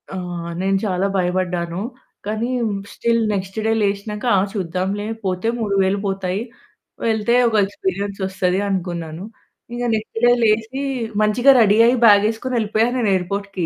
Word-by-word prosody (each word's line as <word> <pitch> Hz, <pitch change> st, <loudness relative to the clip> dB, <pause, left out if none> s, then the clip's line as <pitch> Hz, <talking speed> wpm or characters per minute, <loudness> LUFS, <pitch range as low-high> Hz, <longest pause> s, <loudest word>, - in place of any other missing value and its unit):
ఆ! -, -, -7 dB, 0.5 s
నేను 195 Hz, +1 st, +1 dB
చాలా 190 Hz, -1 st, 0 dB
భయపడ్డాను. 180 Hz, -1 st, -1 dB, 0.4 s
కానీ 220 Hz, +3 st, -2 dB, 0.2 s
మ్ 200 Hz, -1 st, -4 dB
స్టిల్ 230 Hz, 0 st, +1 dB
నెక్స్ట్ 190 Hz, +1 st, -4 dB
డే 220 Hz, -, +2 dB
లేషినక 205 Hz, +1 st, -2 dB
ఆ! -, -, +4 dB
చూద్దాంలే 190 Hz, +2 st, -2 dB, 0.2 s
పోతే 185 Hz, +3 st, -1 dB
3000 200 Hz, -2 st, +1 dB
పోతాయి, 195 Hz, 0 st, -2 dB, 0.6 s
వెళ్తే 225 Hz, +1 st, +1 dB
ఒక 220 Hz, -, -2 dB
ఎక్స్‌పీరియన్సొస్తది 195 Hz, -, -2 dB
అనుకున్నాను. 175 Hz, -3 st, -4 dB, 0.5 s
ఇగా 245 Hz, 0 st, -2 dB
నెక్స్ట్ 220 Hz, +1 st, -5 dB
డే 240 Hz, -, +6 dB
లేసి 225 Hz, +4 st, +1 dB, 0.4 s
మంచిగా 240 Hz, +6 st, +5 dB
రెడీ 210 Hz, -2 st, +5 dB
అయ్యి 245 Hz, +2 st, +3 dB
బ్యాగేసుకొని 220 Hz, +4 st, +3 dB
ఏళ్ళిపోయా 220 Hz, +1 st, +1 dB
నేను 230 Hz, -4 st, +1 dB
ఎయిర్‌పోర్ట్‌కి. 195 Hz, 0 st, -3 dB
200 Hz, 130 wpm, -20 LUFS, 185-220 Hz, 0.6 s, డే